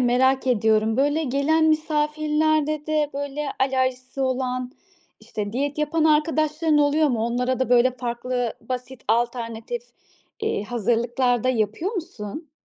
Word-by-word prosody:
merak 260 +2 +3
ediyorum, 220 -2 +2
böyle 290 +4 +2
gelen 285 +4 +2
misafirlerde 305 0 +1
de 305 -1 +1
böyle 285 +1 -3
alerjisi 260 0 0
olan, 255 -1 -1 0.5
işte 210 -2 -5
diyet 285 +4 -2
yapan 300 +1 +1
arkadaşların 310 0 +2
oluyor 295 +1 +3
mu? 240 -4 0
Onlara 250 +2 -1
da 260 - +1
böyle 245 +1 +5
farklı 245 0 -2
basit 255 0 -6
alternatif, 235 - -1 0.6
eee, 435 - 0
hazırlıklar 240 +2 0
da - - +2
yapıyor 240 - 0
musun? 305 - -6
260 Hz, 125 wpm, -23 LUFS, 245-300 Hz, 0.6 s, böyle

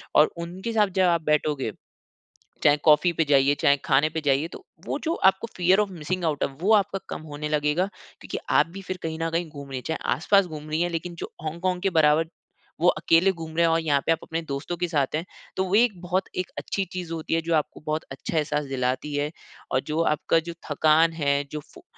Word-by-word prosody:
और 150 - +6
उनके 190 +7 -5
साथ 210 -2 +4
जब - - +5
आप - - -16
बैठोगे, 150 -5 +1 0.9
चाहे 145 0 +6
कॉफ़ी 160 +3 +5
पे 165 - +2
जाइए, 140 -1 +4
चाहे 140 0 +3
खाने 150 +3 +3
पे 160 - -3
जाइए, 140 +3 +2
तो 365 - -11 0.2
वो - - -2
जो 330 +1 0 0.2
आपको 195 +4 -8
फ़ियर 185 +3 +4
ऑफ़ 210 -2 0
मिसिंग 180 +2 -3
आउट 155 -3 0
है, - - 0
वो 165 +10 0
आपका 195 -2 +2
कम - - -6
होने 150 +1 -4
लगेगा 150 +4 +1 0.3
क्योंकि - - -5
आप - - +5
भी 195 - -6
फिर 185 0 -4
कहीं 160 -1 -3
न 165 - 0
कहीं 170 +1 -1
घूम 140 -2 -10
रही 130 - -3
हैं। 125 - -10
चाहे 160 - -1 0.2
आसपास 195 +3 +3
घूम 155 -2 -8
रही 155 +2 +1
हैं, 175 - 0
लेकिन 170 +1 -4
जो - - -8
हॉन्गकॉन्ग 180 +3 -2
के 195 - +2
बराबर 155 +2 +4 0.5
वो 175 - +4
अकेले 170 +2 +4
घूम 160 -2 -8
रहे 170 - +4
हैं 165 - +2
और 165 - +3
यहाँ 145 -3 +2
पे - - +4
आप 165 - 0
अपने 165 0 -3
दोस्तों 140 +3 -4
के 175 +1 -1
साथ 145 -5 0
हैं, 160 - -2 0.3
तो 190 - +1
वो 190 +1 -2
एक 215 -4 +3
बहुत 185 +2 -1
एक 185 0 -2
अच्छी 195 - -2
चीज़ 180 -2 -5
होती 160 0 -2
है, 165 - +2
जो 165 +1 -1
आपको 155 -2 -1
बहुत 155 +1 -1
अच्छा 135 +4 -5
एहसास 150 -1 -1
दिलाती 130 +2 -2
है। 145 +1 0 0.4
और 130 - +3
जो 155 +2 0
आपका 160 - +1
जो 170 - -4 0.2
थकान 155 +2 +4
है, 145 -3 0
जो 150 - -3
फ़ो 155 +1 -18
160 Hz, 235 wpm, -25 LUFS, 150-180 Hz, 0.9 s, और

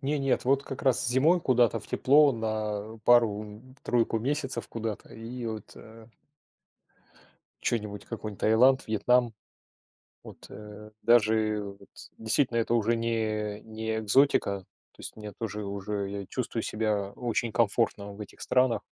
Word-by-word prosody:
Не 145 +1 -1
нет, 135 -1 0
вот 135 +2 +2
как 135 -1 -7
раз 130 -4 +2
зимой 150 +9 +3
куда-то 125 -6 +2
в - - -14
тепло, 145 +2 +5
на 110 -2 -3
пару, 115 -4 +4
м, 110 +5 -12
тройку 115 -2 +1
месяцев 135 -1 -2
куда-то, 110 -2 -5
и 120 +2 -7
вот 110 -2 -6
э 110 0 -14 1.6
чё-нибудь, 105 -3 -2
какой-нибудь 110 -3 -7
Таиланд, 125 +5 +4
Вьетнам. 120 +2 +2 0.9
Вот, - - -12
э, 105 0 -11
даже 110 -2 +3 0.2
вот, - - -18 0.3
действительно, 115 +2 +2
это 115 0 +1
уже 115 0 +2
не 110 -2 -2
не 110 0 -4
экзотика. 110 -3 +3 0.3
То - - -29
есть - - -7
мне, 105 -1 -9
уже 105 -2 -4
уже 100 0 -4
я 100 0 -5
чувствую 120 -2 -3
себя 105 -3 -1
очень 120 0 -2
комфортно 105 -2 0
в 100 - -14
этих 105 - -10
странах 125 -2 +2
110 Hz, 140 wpm, -28 LUFS, 105-120 Hz, 1.6 s, тепло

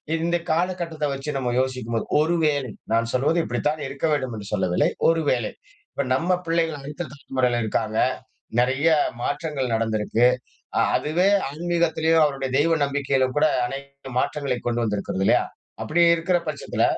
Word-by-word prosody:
இந்த 170 +1 0
காலகட்டத்தை 165 -2 -1
வச்சு 135 +2 -5
நம்ம 125 -2 -1
யோசிக்கும் 130 -3 -2
போது, 110 - -2 0.2
ஒரு 165 +3 +1
வேளை 140 -5 0 0.2
நான் 115 0 +1
சொல்வது 140 +6 +2
இப்படித்தான் 150 +5 -1
இருக்க 135 +3 -4
வேண்டும் 130 -4 -1
என்று 100 -1 -8
சொல்லவில்லை. 90 -3 +2 0.2
ஒரு 165 0 +2
வேளை, 120 -4 0 0.4
இப்ப 140 - -2
நம்ம 180 +6 +1
பிள்ளைகள் 165 -2 0
அடுத்த 150 +4 -6
தலைமுறையில 130 -4 -1
இருக்காங்க. 110 0 -1 0.6
நெறைய 130 +6 +2 0.3
மாற்றங்கள் 145 -3 -2
நடந்திருக்கு. 110 +1 +1 0.5
அ - - +4 0.2
அதுவே 175 +6 +1 0.2
ஆன்மீகத்திலயும், 165 0 +2
அவருடைய 135 -2 -2
தெய்வ 165 +2 +3
நம்பிக்கையிலும் 135 -2 0
கூட 155 +1 +5 0.2
அனைத்து 140 0 -9
மாற்றங்களை 140 -1 -1
கொண்டு 120 0 0
வந்திருக்கிறது 100 -3 -2
இல்லையா. - - +4 0.4
அப்படி 170 +3 +1
இருக்கிற 175 +2 +1
பட்சத்துல, 145 -2 -2
140 Hz, 145 wpm, -24 LUFS, 125-160 Hz, 0.6 s, கூட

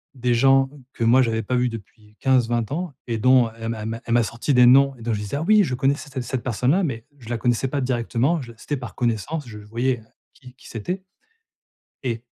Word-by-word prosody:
des 125 -1 0
gens 135 +2 +4 0.2
que 115 - -3
moi 125 +3 +5
j'avais 115 -2 0
pas 125 +5 -1
vu 125 0 +2
depuis 105 -1 -12
15-20 120 -3 +1
ans 170 -1 -3
et 115 -2 -2
dont, 125 -1 +4
elle 115 0 -4
m'a 115 -1 -3
elle 110 - -4
m'a 115 0 -5
elle 115 - -1
m'a 120 -1 +4
sorti 120 +6 -2
des 125 -1 +7
noms 135 +2 +6
dont 115 0 -2
je 105 - -2
disais: 105 +6 -4
«Ah 155 - -2
oui 210 +2 +5
je 130 -6 -2
connaissais 140 +3 0
c 130 -2 -4
cette 125 0 -4
personne-là» 130 - +1
mais 115 -7 -3
je 115 -1 -12
la 120 - -1
connaissais 120 +3 +1
pas 140 +1 -2
directement, 125 +5 0
je 120 -2 -10
c'était 145 +5 -4
par 120 -2 -8
connaissance, 125 +5 -2
je 105 -2 -9
voyais 115 +3 -2 0.3
qui 125 -3 -15
qui - - -16
c'était 180 - -4 1.0
et 115 -2 -3
125 Hz, 230 wpm, -23 LUFS, 115-135 Hz, 1.0 s, des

